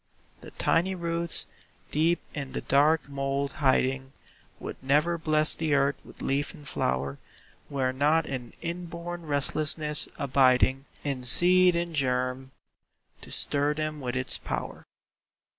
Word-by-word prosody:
The - - -11
tiny 185 +3 +1
roots, 170 -1 -3 0.5
deep 165 +3 +1
in 140 -3 -6
the - - -3
dark 150 +3 +2
mould 140 0 -2
hiding, 135 0 +1 0.5
Would - - -8
never 150 +6 +2
bless 155 -1 +5
the 155 -3 0
earth 140 0 +1
with - - -13
leaf 145 +6 -2
and 150 -3 -13
flower 70 +2 -2 0.5
Were 130 -2 -1
not 150 +4 +2
an 125 -3 -6
inborn 170 0 -6
restlessness 150 +1 +4
abiding 130 0 +2 0.2
In 140 -3 -2
seed 180 +7 +4
and 170 0 -2
germ, 130 -1 -1 0.7
to - - -11
stir 145 +1 +1
them 155 -1 -4
with 125 -1 -4
its 130 0 -1
power. - - -6
145 Hz, 130 wpm, -27 LUFS, 135-165 Hz, 0.7 s, bless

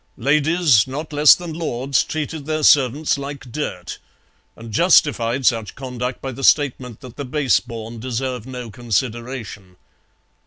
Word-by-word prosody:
Ladies 150 - +3
not 150 +4 -6
less 150 0 +7
than 175 -2 -7
lords 140 -4 -1
treated 155 -1 -5
their 155 0 -1
servants 140 +2 +3
like 140 -2 -8
dirt, 90 -11 -5 0.6
and 115 0 -11
justified 130 - +3
such 115 -5 +1
conduct 125 -1 -5
by 135 - -3
the 135 +2 -8
statement 125 -5 +2
that 125 -2 -12
the 145 - -4
base 135 0 +1
born 115 0 -8
deserve 125 0 -4
no 125 -3 -7
consideration. 115 -3 -4
130 Hz, 140 wpm, -20 LUFS, 120-145 Hz, 0.6 s, less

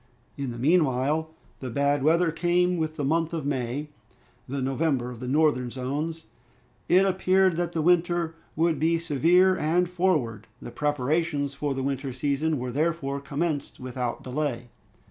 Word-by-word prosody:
In 140 -2 -4
the 120 - -6
meanwhile, 150 +1 +2 0.3
the 130 - -5
bad 140 +2 +1
weather 165 +3 +3
came 175 +2 +1
with 155 -1 -2
the 150 - -3
month 165 +3 0
of 155 -4 -4
May, 135 +1 -2 0.6
the 140 +1 -2
November 135 -1 0
of 120 - -9
the 125 - -6
northern 140 -3 +2
zones. 145 +6 -4 0.6
It 185 +2 +5
appeared 190 -1 +3
that 175 -1 -1
the 160 - -1
winter 175 -1 +2 0.2
would 160 -2 +1
be 165 +2 +2
severe 170 +4 +3
and 175 +2 +1
forward. 160 - 0
The - - -9
preparations 145 0 0
for 140 0 -2
the 135 - -2
winter 135 0 -2
season 145 +4 0
were 125 0 -4
therefore 145 -1 -1
commenced 145 +1 -3
without 125 -1 -4
delay. 125 -3 -3
150 Hz, 155 wpm, -26 LUFS, 135-165 Hz, 0.6 s, It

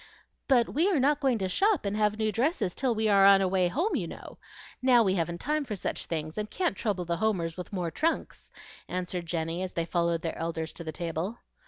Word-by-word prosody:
"But 245 -4 +4
we 330 +7 +3
are 355 -8 +2
not 290 +3 +3
going 265 -4 +2
to 190 -3 -1
shop 395 - +2
and 200 +1 -1
have 210 0 +1
new 220 -1 0
dresses 230 - 0
till 255 -3 0
we 220 0 +1
are 200 -2 +5
on 195 0 +8
our 190 - +2
way 185 -1 +2
home, 335 - 0
you - - -1
know. - - -10 0.4
Now 250 -2 +5
we 190 -3 +2
haven't 170 -1 -2
time 300 +1 0
for 225 -6 -4
such 190 - -3
things, 155 +2 -3
and 210 0 -3
can't 360 - -1
trouble 195 -6 -2
the 170 0 -1
Homers 175 -5 0
with 180 - -7
more 180 -4 -2
trunks," 330 - -2 0.4
answered 180 -1 -4
Jenny, 165 +1 -2
as 185 -1 -4
they 170 - -1
followed 170 -1 0
their 165 - -2
elders 160 -1 -3
to 170 - -8
the 160 - -4
table. 170 +7 -4
195 Hz, 230 wpm, -28 LUFS, 170-240 Hz, 0.4 s, on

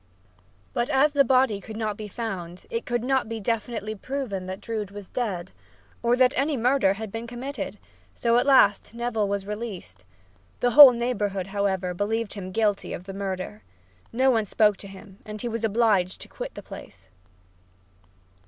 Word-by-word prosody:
But 240 +3 0
as 290 +1 +3
the 280 -1 +5
body 255 -5 +3
could 220 +3 -8
not 215 -2 -2
be 215 0 -7
found, 185 -5 -6
it 230 - -3
could 240 -1 -1
not 265 -2 +1
be 225 -1 -4
definitely 220 0 -2
proven 220 -5 -4
that 190 +1 -5
Drood 215 -2 -4
was 200 -1 -9
dead, 195 - -3 0.5
or 235 +1 +3
that 255 +1 +4
any 280 +2 +1
murder 245 -4 +3
had 215 0 -7
been 225 +2 -5
committed, 255 +4 -5 0.4
so 235 0 +2
at 250 - -1
last 230 -5 +4
Neville 235 -3 -1
was 200 -1 -2
released. 210 - -7 0.6
The 245 - +2
whole 275 +2 +11
neighborhood, 215 -6 -1
however, 195 -2 -1
believed 215 +4 -2
him 185 -2 -7
guilty 210 -1 0
of - - -6
the 195 +1 -8
murder. 185 - -4 0.5
No 260 +3 +3
one 225 -3 +1
spoke 210 0 +3
to 200 - -9
him 195 0 -13
and 215 0 -8
he 240 - -3
was 230 -1 -3
obliged 210 -4 +2
to - - -8
quit - - -7
the - - -8
place. - - -12
220 Hz, 175 wpm, -25 LUFS, 195-240 Hz, 0.6 s, whole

